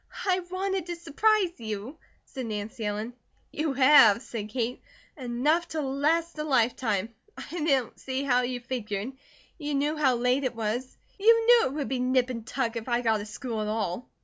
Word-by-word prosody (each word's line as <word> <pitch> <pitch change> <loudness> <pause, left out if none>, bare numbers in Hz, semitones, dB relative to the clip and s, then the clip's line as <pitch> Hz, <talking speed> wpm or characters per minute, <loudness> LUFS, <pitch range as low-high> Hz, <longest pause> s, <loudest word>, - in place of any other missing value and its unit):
"I 370 -2 +2
wanted 380 -1 -2
to 345 - -3
surprise 360 - +1
you," 220 +6 -6 0.3
said 260 -4 -6
Nancy 215 +1 -5
Ellen. 210 +3 -3 0.4
"You 305 -2 -1
have," 260 -5 +6
said 215 -4 -6
Kate. 245 +1 -2 0.3
"Enough 290 +6 0
to 315 -2 -3
last 305 +5 0
a - - -1
lifetime. 230 -6 +1 0.2
I 340 -2 -5
don't 270 -7 +1
see 265 +1 -3
how 250 -3 +3
you 245 0 -3
figured. 230 -2 -4 0.5
You 295 -2 -2
knew 295 +3 +1
how 275 -5 +3
late 250 +3 +1
it 255 -2 -2
was. 230 +4 -3 0.2
You 455 +2 +5
knew 475 0 +6
it 260 - -6
would 290 -2 -3
be 260 -1 -2
nip 255 0 +2
and 230 -2 -7
tuck 245 -1 -2
if 230 +2 -6
I 240 0 +1
got 220 -3 +1
a 205 - -7
school 225 0 -4
at 210 - -2
all." 215 0 -3
255 Hz, 185 wpm, -27 LUFS, 230-300 Hz, 0.5 s, have